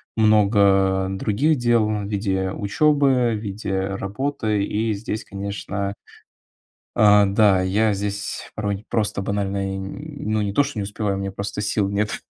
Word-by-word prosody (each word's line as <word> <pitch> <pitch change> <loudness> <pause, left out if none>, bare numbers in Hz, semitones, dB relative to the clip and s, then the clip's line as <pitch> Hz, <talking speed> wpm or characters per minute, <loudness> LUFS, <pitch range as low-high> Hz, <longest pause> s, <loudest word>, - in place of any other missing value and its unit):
много 100 -3 +3
других 110 +11 +1
дел 120 -3 +2
в 105 -1 -2
виде 95 -2 -1
учёбы, 135 +3 +2
в 110 - -1
виде 100 -1 -4
работы. 105 +3 -2
И 110 +1 -1
здесь, 105 +1 -4
конечно 100 0 -4 1.0
А, 105 -1 +6
да, 100 -1 +4
я 105 +4 +2
здесь 100 +1 -4
порой 105 -2 -2
не 105 - -13
просто 105 -3 -1
банально 100 -1 -2
и - - -3
н 145 +6 -6
ну, 110 - +1
не 100 -1 -2
то 145 - +4
что 140 -5 -5
не - - -1
успеваю, 100 0 -2
у - - -3
меня 100 0 -4
просто 100 +1 -4
сил 105 -1 0
нет. 105 +1 -2
105 Hz, 160 wpm, -22 LUFS, 100-110 Hz, 1.0 s, А